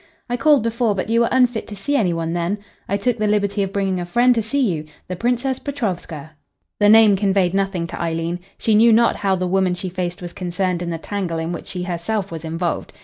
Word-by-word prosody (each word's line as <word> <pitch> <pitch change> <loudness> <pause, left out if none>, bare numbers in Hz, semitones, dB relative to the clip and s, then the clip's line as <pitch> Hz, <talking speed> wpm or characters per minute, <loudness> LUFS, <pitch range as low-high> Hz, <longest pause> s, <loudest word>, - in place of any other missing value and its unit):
"I - - +2
called 285 0 +4
before, 230 -2 0
but 190 +2 -3
you 230 - +3
were 235 - +3
unfit 250 -3 +2
to 210 - -7
see 205 +9 -2
any 205 -10 +2
one 165 0 -2
then. 175 +4 -1 0.3
I 200 - +1
took 230 +3 -1
the 215 - +1
liberty 205 -1 +1
of 195 -1 -1
bringing 195 -2 -1
a 175 - -3
friend 245 +7 +4
to 230 - 0
see 225 +7 -2
you 155 -1 -5 0.2
the 185 - -4
Princess 245 +5 -1
Petrovska." 180 - -4 0.5
The 205 -1 +5
name 220 -2 +7
conveyed 190 -2 +1
nothing 195 -3 0
to - - -6
Eileen. 165 +1 -2 0.2
She 220 - +1
knew 225 +2 +6
not 235 +1 +4
how 195 -1 +1
the 185 0 -2
woman 185 0 +1
she 185 +1 -4
faced 180 -1 -4
was 175 -1 -7
concerned 180 0 -2
in 175 - -3
the 165 - -2
tangle 180 -1 -3
in 165 +1 -3
which 170 - -6
she 180 -1 -4
herself 185 +3 -3
was 165 -1 -6
involved. 165 +1 -3
195 Hz, 235 wpm, -20 LUFS, 175-220 Hz, 0.5 s, name